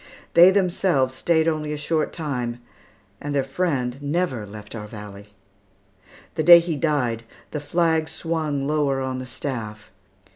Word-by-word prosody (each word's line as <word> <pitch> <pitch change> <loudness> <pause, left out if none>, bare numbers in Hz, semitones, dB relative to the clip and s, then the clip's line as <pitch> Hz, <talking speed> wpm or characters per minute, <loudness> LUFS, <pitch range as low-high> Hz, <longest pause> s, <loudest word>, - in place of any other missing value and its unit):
They 175 +2 +9
themselves 180 -8 +2
stayed 160 +4 +1
only 155 -2 -1
a 150 - -3
short 155 +1 -1
time, 125 -7 -3 0.6
and 145 0 -3
their 140 - +2
friend 135 -3 -2
never 145 - -1
left 105 +1 -10
our 105 -2 -6
valley. 105 -1 -11 1.0
The - - -1
day 175 +2 +10
he 170 -1 -1
died, 135 -7 0 0.3
the 150 - -3
flag 160 +1 +1
swung 155 -4 -2
lower 145 -2 +1
on 130 -1 -3
the 130 - -7
staff. 115 -5 -5
145 Hz, 145 wpm, -23 LUFS, 125-160 Hz, 1.0 s, day